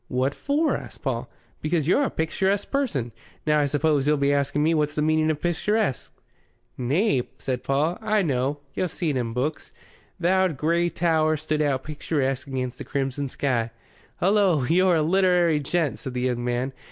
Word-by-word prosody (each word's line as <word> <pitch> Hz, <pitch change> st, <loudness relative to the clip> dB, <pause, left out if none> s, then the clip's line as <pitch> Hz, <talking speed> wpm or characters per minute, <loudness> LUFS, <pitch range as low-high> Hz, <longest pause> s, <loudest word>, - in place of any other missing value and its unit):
"What 130 Hz, +2 st, 0 dB
for?" 300 Hz, +2 st, 0 dB
asked -, -, -9 dB
Paul. -, -, -2 dB, 0.3 s
"Because 155 Hz, -1 st, 0 dB
you're 185 Hz, -, +4 dB
a 280 Hz, -, +1 dB
picturesque 190 Hz, +5 st, -1 dB
person. 150 Hz, -, -1 dB, 0.3 s
Now, 150 Hz, -1 st, +3 dB
I 145 Hz, -, +2 dB
suppose 145 Hz, 0 st, +1 dB
you'll 150 Hz, 0 st, +3 dB
be 140 Hz, 0 st, +2 dB
asking 140 Hz, +1 st, +1 dB
me 160 Hz, +2 st, +3 dB
what's 150 Hz, -1 st, 0 dB
the 150 Hz, -, 0 dB
meaning 155 Hz, 0 st, +2 dB
of 155 Hz, -2 st, 0 dB
picturesque?" 175 Hz, -, 0 dB, 0.6 s
"Nay," 140 Hz, -, +1 dB, 0.2 s
said 125 Hz, -2 st, -3 dB
Paul. 150 Hz, +6 st, 0 dB
"I 215 Hz, -2 st, +2 dB
know. 140 Hz, -1 st, -1 dB
Yo' 185 Hz, -, -1 dB
see 170 Hz, -2 st, -2 dB
it -, -, -3 dB
in 120 Hz, -3 st, -2 dB
books. 140 Hz, +6 st, -3 dB, 0.5 s
'Th' 170 Hz, -, -4 dB
owd 185 Hz, -4 st, +3 dB
grey 170 Hz, +4 st, +1 dB
tower 160 Hz, -2 st, +1 dB
stood 155 Hz, 0 st, -1 dB
out 140 Hz, -3 st, 0 dB
picturesque 145 Hz, -3 st, -2 dB
against 130 Hz, -2 st, -4 dB
the -, -, -5 dB
crimson 140 Hz, 0 st, -2 dB
sky.'" 120 Hz, -4 st, -1 dB, 0.5 s
"Hullo! 190 Hz, -6 st, +3 dB
you're 180 Hz, +2 st, +4 dB
a 160 Hz, -, +2 dB
literary 175 Hz, -2 st, +3 dB
gent," 150 Hz, +1 st, -1 dB
said 130 Hz, -3 st, -6 dB
the 125 Hz, -, -1 dB
young 125 Hz, -1 st, -1 dB
man. 125 Hz, +2 st, -1 dB
150 Hz, 180 wpm, -25 LUFS, 135-175 Hz, 0.6 s, you're